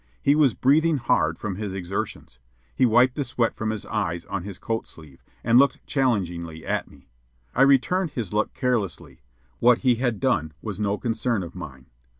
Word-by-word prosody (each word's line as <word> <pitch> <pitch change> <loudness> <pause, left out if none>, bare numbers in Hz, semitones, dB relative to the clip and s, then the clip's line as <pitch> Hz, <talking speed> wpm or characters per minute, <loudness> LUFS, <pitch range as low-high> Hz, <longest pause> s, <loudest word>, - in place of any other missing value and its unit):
He 140 - +5
was 145 -5 +3
breathing 155 +4 +3
hard 80 -10 +1
from 100 -2 -4
his 100 -2 -4
exertions. 90 -9 -5 0.4
He 130 - +4
wiped 120 +3 +4
the 145 - -2
sweat 120 -3 0
from 110 - -3
his 110 -2 -4
eyes 90 -5 -2
on 100 -1 -4
his 95 0 -7
coat 115 0 -3
sleeve, 75 -4 -15 0.2
and 115 +2 +5
looked 140 +1 +2
challengingly 90 - -1
at - - -2
me. - - -19 0.5
I - - +1
returned 140 +7 +4
his 115 -9 -5
look 105 +1 0
carelessly; 125 - -2 0.4
what 120 0 +5
he 125 -2 +4
had 120 -3 -1
done 80 - 0
was 105 -3 -6
no 105 -1 0
concern 115 -2 -1
of 85 - -9
mine. 70 -7 -9
110 Hz, 180 wpm, -24 LUFS, 90-125 Hz, 0.5 s, He